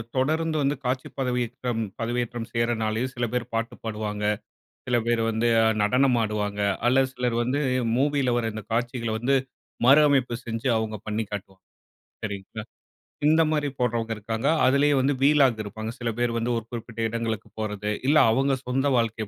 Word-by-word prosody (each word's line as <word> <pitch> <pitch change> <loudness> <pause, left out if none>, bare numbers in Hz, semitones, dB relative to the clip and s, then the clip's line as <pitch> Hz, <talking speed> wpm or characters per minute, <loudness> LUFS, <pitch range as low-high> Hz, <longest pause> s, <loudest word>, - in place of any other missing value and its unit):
தொடர்ந்து 155 +4 +1
வந்து 140 +1 +1
காட்சி 130 +1 -1
பதவியேற்றம் 125 -2 -1 0.2
பதவியேற்றம் 120 0 -2
செய்றனாலயும் 115 +1 0
சில 120 - 0
பேர் 125 -1 0
பாட்டு 115 0 -2
பாடுவாங்க, 105 -1 -4 0.6
சில 120 -1 +2
பேர் 120 -1 +2
வந்து 115 +2 0 0.3
நடனம் 125 +4 +3
ஆடுவாங்க, 105 -1 -2 0.2
அல்லது 130 +2 +4
சிலர் 125 -2 -1
வந்து 130 +4 0 0.4
மூவியில 140 -2 +2
வர 120 - 0
இந்த 110 -2 -6
காட்சிகள்ல 115 -1 -1
வந்து 135 +3 +2 0.5
மறு 140 +4 +8
அமைப்பு 135 -4 +2
செஞ்சு 115 +2 -3
அவங்க 110 -1 -2
பண்ணிக்காட்டு. 105 -2 -4 0.7
சரிங்களா 105 +1 -5 0.6
இந்த 160 +2 +5
மாரி 150 -2 +1
போடறவங்க 115 -2 0
இருக்காங்க. 110 +5 -3 0.2
அதிலேயே 140 +2 +4
வந்து 140 +2 +2
வீலாகு 135 -6 +4
இருப்பாங்க. 110 +2 -6
சில 120 - -1
பேர் 120 -1 +1
வந்து 115 +1 -1
ஒரு 115 - -5
குறிப்பிட்ட 115 -1 -7
இடங்களுக்கு 115 -2 -3
போறது, 105 -1 -2 0.2
இல்ல 150 - +5 0.2
அவங்க 135 +2 +2
சொந்த 135 +2 +1
வாழ்க்கை 115 -2 -1
120 Hz, 150 wpm, -25 LUFS, 110-130 Hz, 0.7 s, மறு